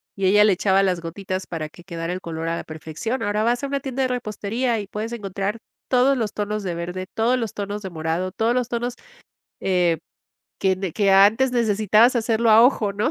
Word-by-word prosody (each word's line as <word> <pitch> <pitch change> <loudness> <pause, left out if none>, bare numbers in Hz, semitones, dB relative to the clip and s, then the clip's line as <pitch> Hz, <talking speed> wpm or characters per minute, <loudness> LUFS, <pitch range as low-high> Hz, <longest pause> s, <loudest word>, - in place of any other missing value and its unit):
y 195 - -1
ella 205 +2 +6
le 210 -2 +5
echaba 190 +1 +2
las 185 -2 +1
gotitas 185 +2 -5
para 155 -2 -5
que 175 - -16
quedara 170 -2 -5
el 185 - -5
color 165 -1 -5
a 165 - 0
la - - -5
perfección. 160 +10 -5
Ahora 210 +1 0
vas 240 +3 +1
a - - -1
una 280 0 -1
tienda 270 0 -3
de - - +2
repostería 230 0 -2
y 200 - -6
puedes 215 +3 -5
encontrar 200 0 -3 0.3
todos 260 +2 +3
los 215 -4 -2
tonos 210 0 -3
de 180 -3 -2
verde, 180 +2 -5
todos 235 +4 +2
los 225 -5 -3
tonos 205 +1 -4
de 190 - -4
morado, 165 +3 -2
todos 225 +5 0
los 250 -2 0
tonos, 240 0 -2 0.7
eh, 180 -3 +2 0.6
que 190 -2 0
que 200 -2 +2
antes 215 +7 +5
necesitabas 220 +1 +3
hacerlo 230 0 +1
a 220 +1 +8
ojo, 235 -5 +3
¿no? 215 +7 0
205 Hz, 210 wpm, -22 LUFS, 185-235 Hz, 0.7 s, a